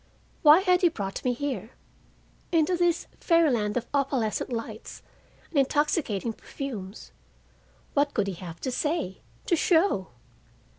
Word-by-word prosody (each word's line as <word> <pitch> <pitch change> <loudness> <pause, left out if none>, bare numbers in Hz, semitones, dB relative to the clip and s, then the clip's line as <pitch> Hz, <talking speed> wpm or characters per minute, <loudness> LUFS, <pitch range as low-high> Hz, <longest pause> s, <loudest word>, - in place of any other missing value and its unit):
Why 310 +4 +8
had 365 -2 +3
he 355 - +5
brought 200 -10 -5
me 250 - +2
here, 245 -4 -4 0.8
into 330 +1 +3
this 350 -1 +1
fairyland 255 - +2
of 240 - -2
opalescent 265 -5 0
lights 225 -2 -6 0.5
and 295 - +2
intoxicating 270 - +1
perfumes? 220 -7 -7 0.8
What 285 0 +1
could 210 - +2
he 195 - -3
have 170 -1 -9
to 260 - -2
say—to 300 - -2
show? 325 - +2
270 Hz, 120 wpm, -27 LUFS, 215-325 Hz, 0.8 s, Why